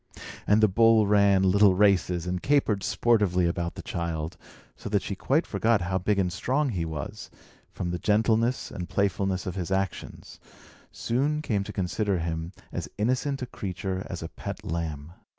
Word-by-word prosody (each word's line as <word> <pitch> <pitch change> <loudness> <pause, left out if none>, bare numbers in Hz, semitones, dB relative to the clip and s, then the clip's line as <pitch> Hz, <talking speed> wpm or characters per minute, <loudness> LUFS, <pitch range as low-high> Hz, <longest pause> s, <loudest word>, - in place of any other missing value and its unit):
And 105 +2 +4
the - - +8
bull 115 +2 +5
ran 100 -2 +4
little 95 0 +5
races, 90 -3 +2
and 90 0 -2
capered 135 -8 +2
sportively 100 -6 +2
around 85 0 -1
the - - -8
child; 85 -1 -3 0.4
so - - -7
that 100 -1 +1
she - - -3
quite 140 - +1
forgot 110 +1 +1
how 95 +2 -1
big 100 +3 0
and 90 -3 0
strong 135 +9 0
he 90 -8 -2
was, 80 -4 -6
and, - - -25 0.3
from 85 -2 -4
the 90 - -3
gentleness 110 +5 +1
and 90 -1 -6
playfulness 95 -1 0
of 90 - -3
his 90 -2 -4
actions, 95 -1 -4 0.5
soon 145 +6 -1
came 105 -8 0
to - - -6
consider 95 +1 -1
him 80 0 -3 0.2
as - - -5
innocent 130 +5 0
a - - -2
creature 95 -4 -4
as 85 -2 -5
a 80 - -6
pet - - -7
lamb. 80 -2 -4
95 Hz, 175 wpm, -27 LUFS, 90-110 Hz, 0.5 s, the